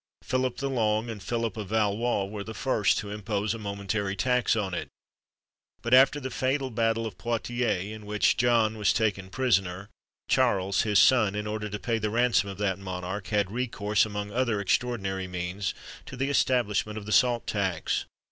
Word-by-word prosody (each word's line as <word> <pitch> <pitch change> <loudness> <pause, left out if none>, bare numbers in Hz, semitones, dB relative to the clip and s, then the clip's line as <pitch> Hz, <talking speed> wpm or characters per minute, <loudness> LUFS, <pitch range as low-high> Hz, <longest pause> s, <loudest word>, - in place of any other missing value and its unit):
Philip 130 -1 -1
the 140 - -2
Long 115 -3 0
and 105 -3 -8
Philip 115 +2 -2
of 105 -3 -5
Valois 110 0 +1
were 100 +1 -6
the 110 +2 -8
first 115 -6 +1
to 100 - -4
impose 105 0 -2
a 115 - -6
momentary 100 -1 -3
tax 125 +4 +2
on 100 -4 -2
it; 90 - -3 1.0
but 120 - 0
after 135 +3 +6
the 130 -2 -5
fatal 130 +1 -1
battle 115 0 +1
of 100 -5 -7
Poictiers, 120 -4 -1
in 105 -1 -10
which 105 0 +2
John 115 -3 +2
was 105 - +3
taken 100 -4 0
prisoner, 95 -5 0 0.4
Charles, 100 -7 +2
his 105 -2 +2
son, 110 -2 +5
in 105 0 -3
order 105 0 -3
to 105 - -4
pay 115 +3 -1
the 105 0 -1
ransom 115 -2 +2
of 100 - -7
that 100 -2 -1
monarch, 95 +1 -5
had 105 -2 0
recourse, 105 -4 0
among 105 -1 -4
other 120 -2 0
extraordinary 95 -3 -1
means, 90 +2 -3 0.3
to 130 - -8
the 135 +2 0
establishment 110 -6 +1
of 105 - -6
the 110 - -5
salt 120 0 +3
tax. 95 -5 -1
105 Hz, 180 wpm, -27 LUFS, 100-120 Hz, 1.0 s, after